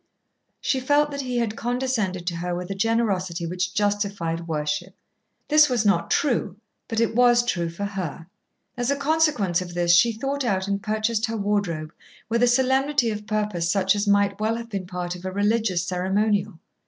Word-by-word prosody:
She 265 - 0
felt 290 +3 +2
that 280 0 -3
he 250 -2 -3
had 230 -2 -1
condescended 235 -7 -2
to 170 -1 -2
her 175 +1 -3
with 180 +2 -5
a - - 0
generosity 195 -5 0
which 180 +2 -3
justified 200 -5 -1
worship. 155 +3 -2 0.5
This 305 -1 +6
was 240 -4 0
not 200 - +2
true, 245 - +1 0.3
but 225 - -2
it 230 -1 +1
was 240 0 +4
true 175 -8 -1
for 170 +5 -5
her. 185 -6 -5 0.5
As 245 +1 -1
a 280 - +2
consequence 280 - +1
of 175 -1 -7
this 175 0 +4
she 235 +6 +5
thought 275 +5 -3
out 195 -5 0
and 200 0 -1
purchased 215 +2 0
her 225 0 -3
wardrobe 200 -6 -1 0.4
with 230 +1 +1
a 245 - +5
solemnity 265 0 +2
of 210 0 -6
purpose 210 -6 -1
such 195 0 +2
as 205 0 -1
might 200 0 +2
well 220 +1 0
have 230 0 -7
been 195 -3 -4
part 180 -1 -4
of 180 - -11
a 185 - -3
religious 205 -2 +1
ceremonial. 190 +1 0
205 Hz, 185 wpm, -24 LUFS, 180-235 Hz, 0.5 s, This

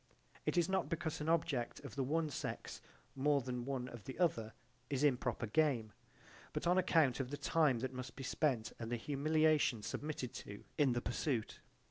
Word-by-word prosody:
It - - +1
is 170 -1 +4
not 190 0 0
because 165 -2 -2
an 155 - -1
object 155 -7 +1
of 140 - -8
the 140 - 0
one 155 +3 0
sex - - -4 0.3
more 140 +1 +3
than 125 -2 -4
one 130 -2 -2
of 120 -5 -9
the 130 - -6
other 115 -11 +1 0.4
is 140 0 0
improper 125 -4 +2
game: 120 -3 +2 0.6
but - - -2
on 180 +2 +4
account 155 -8 +3
of 130 -2 -2
the 145 - -4
time 150 -6 +3
that 130 0 -2
must 130 -1 -6
be 135 - -6
spent 130 -4 0
and 115 0 -4
the 120 - +1
humiliation 150 -2 +2
submitted 145 -3 -3
to 100 -5 -8
in 140 -4 +4
the 120 - 0
pursuit. 120 -1 -1
135 Hz, 185 wpm, -37 LUFS, 120-155 Hz, 0.6 s, is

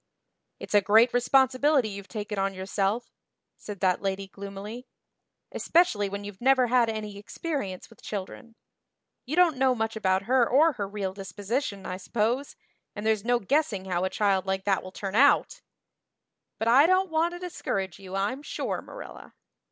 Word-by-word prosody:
"It's - - -8
a 205 - +6
great 220 +5 +5
responsibility 265 +1 +3
you've 200 -1 -8
taken 210 -2 -5
on 195 0 -1
yourself," 195 +4 -2 0.4
said 205 -3 -9
that 185 -1 +2
lady 195 0 -2
gloomily, 200 +5 -8 0.6
"especially 230 - +2
when 200 +1 -5
you've 205 0 -9
never 260 0 +4
had 240 -1 +3
any 210 -2 -5
experience 205 - -5
with 230 - -19
children. 215 +3 -7 0.7
You 295 - -2
don't 345 -5 +4
know 260 -1 +3
much 225 -1 -2
about 190 -3 +1
her 250 -1 +3
or 310 +6 +5
her 205 -6 -4
real 195 -2 -4
disposition, 200 +2 -4
I 185 - -4
suppose, 235 +8 -1 0.4
and 210 0 -6
there's 220 -2 +1
no 245 +1 +2
guessing 235 -3 0
how 180 -1 -1
a 190 - 0
child 195 -2 +1
like 190 0 -1
that 195 -2 +2
will 185 - -10
turn 195 0 -5
out. 275 +6 +4 1.0
But 225 - -2
I 270 +7 +6
don't 370 0 +2
want 330 +2 +1
to - - -8
discourage 195 - -4
you 190 -1 -8
I'm 205 +8 -1
sure, - - -3
Marilla." - - -11
215 Hz, 165 wpm, -27 LUFS, 195-255 Hz, 1.0 s, a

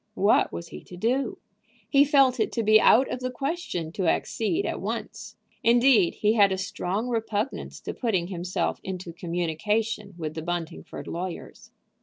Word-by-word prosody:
What - - +3
was 85 0 -7
he 75 - -10
to 180 - -11
do? 245 +5 0 0.5
He 275 +4 +5
felt 270 -3 +4
it 220 - +1
to 230 - 0
be 215 0 +6
out 260 +4 +6
of 250 - -3
the 255 0 -2
question 255 - -3
to 185 0 -2
accede 325 - 0
at - - -3
once. - - -5 0.3
Indeed, 235 -5 +5
he 210 +1 +2
had 200 -3 +5
a 190 - 0
strong 195 +3 -3
repugnance 225 0 -3
to - - -5
putting 205 -8 0
himself 180 -1 -2
into 185 -2 -6
communication 190 +5 -2
with 155 -2 -4
the 160 - -5
Buntingford 175 0 -5
lawyers. 175 +1 -6
210 Hz, 165 wpm, -26 LUFS, 175-240 Hz, 0.5 s, be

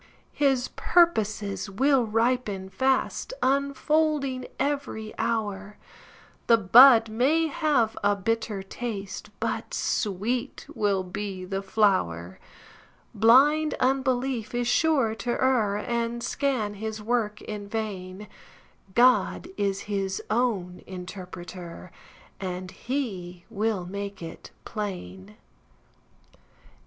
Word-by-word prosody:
His 270 -3 +1
purposes 215 - +1
will 260 +4 +2
ripen 225 -4 0
fast, 265 - 0
Unfolding 280 0 +1
every 275 -7 -2
hour; 205 -2 -2 0.7
The 230 - +6
bud 230 +3 +8
may 265 +9 +2
have 290 -7 +1
a 205 0 +3
bitter 210 0 -2
taste, 200 -1 -6
But - - -3
sweet 230 +6 -2
will 200 -2 +1
be 190 0 -5
the 195 +1 -3
flower. 185 - 0 0.7
Blind 280 +8 +5
unbelief 260 -3 0
is 245 0 0
sure 270 -4 +2
to 230 +3 -3
err, 240 -7 +2
And 235 +1 -2
scan 255 -7 -1
his 220 +1 -5
work 215 -1 -1
in 205 -1 -6
vain; 200 -2 -5 0.7
God 255 +7 +3
is 195 -1 -1
his 195 -2 -2
own 210 -7 0
interpreter, 180 -1 -8 0.5
And 185 -1 -5
he 190 -10 -4
will 210 -3 -1
make 200 0 -6
it 165 - -9 0.2
plain. 105 - -6
215 Hz, 100 wpm, -26 LUFS, 195-255 Hz, 0.7 s, bud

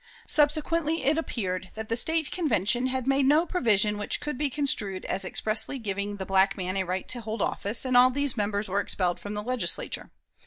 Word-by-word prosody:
Subsequently 310 +2 +2
it 295 +3 +2
appeared 185 - -4
that 220 0 -6
the 230 - -1
State 320 +5 +3
Convention 245 - +1
had 260 -1 -3
made 270 0 +2
no 305 +4 +4
provision 210 - +1
which 205 - 0
could 300 -1 -5
be 290 +2 -1
construed 235 -9 -2
as 195 - -2
expressly 215 +8 0
giving 205 -3 -4
the 190 - -5
black 195 +1 +2
man 185 0 -3
a 190 - +1
right 185 +1 -4
to 245 - -2
hold 220 0 -5
office, 205 +5 +1
and 255 -1 0
all 250 +1 +7
these 280 0 +1
members 205 -1 -1
were 195 +2 -1
expelled 180 -3 0
from 205 +1 -7
the 210 - -4
Legislature. 250 +2 -2
225 Hz, 200 wpm, -26 LUFS, 200-280 Hz, -, all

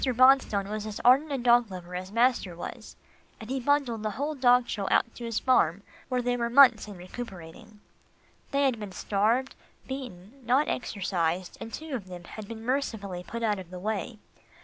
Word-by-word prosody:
Bonstone 255 -5 +4
was 215 +1 -4
as 210 - -6
ardent 275 +5 +5
a 275 - 0
dog 240 -2 +4
lover 180 -1 -9
as 185 +1 -5
master 230 -6 +2
was, 170 - -8 0.4
and 220 +3 -8
he 265 - -1
bundled 260 -4 +1
the 215 - -1
whole 290 +3 -1
dog 250 -3 +4
show 200 -2 -3
out 230 - +2
to 240 - -8
his 230 -2 -2
farm, 200 -7 +2 0.3
where 250 -1 0
they 245 0 +1
were 235 -1 -1
months 245 -4 +6
in 205 -3 -9
recuperating. 195 +2 -10 0.7
They 280 0 +1
had 260 -5 +1
been 205 -3 -7
starved, 220 +8 0 0.3
beaten, 255 -2 -8
not 255 +5 +2
exercised, 185 -5 -2
and 225 - -7
two 315 +2 -7
of 215 -8 -4
them 180 -1 -9
had 215 +5 -9
to 230 - -5
be - - -10
mercifully 220 -7 -2
put 230 +5 -6
out 210 -3 +1
of 180 -2 -10
the 180 - -8
way. 210 +1 -3
225 Hz, 195 wpm, -28 LUFS, 195-255 Hz, 0.7 s, months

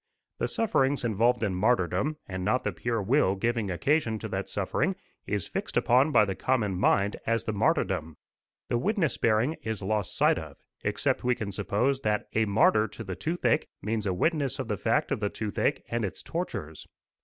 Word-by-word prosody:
The - - 0
sufferings 145 - +1
involved 120 +1 +2
in 100 -3 0
martyrdom, 105 - +1
and 95 -1 -4
not 115 +7 +1
the - - -1
pure 115 -3 -2
will 105 -3 +3
giving 115 0 -1
occasion 110 - +1
to - - -5
that - - -3
suffering, - - 0 0.3
is 105 -3 -2
fixed - - -3
upon 130 +6 +4
by 105 - +5
the 95 - -2
common 110 -4 0
mind 100 +2 +2
as 115 0 +1
the 110 - -2
martyrdom. 100 - 0 0.5
The 120 - 0
witness 190 - 0
bearing 115 +8 +2
is 110 -2 -4
lost 105 -1 -1
sight - - +4
of, 80 -3 -10 0.3
except - - 0
we 125 0 +2
can 110 -4 -4
suppose 105 +8 0
that 105 -4 0
"a 110 - +2
martyr 105 +1 +4
to 115 +2 -9
the 95 -3 -5
toothache" 160 - 0 0.2
means 105 -1 -1
a 95 - +1
witness 145 - 0
of 130 -4 -4
the 105 - +1
fact - - 0
of - - 0
the 105 -1 0
toothache 105 -3 -1
and 120 -1 -2
its 95 -2 -4
tortures. 80 - -5
110 Hz, 190 wpm, -28 LUFS, 100-130 Hz, 0.5 s, by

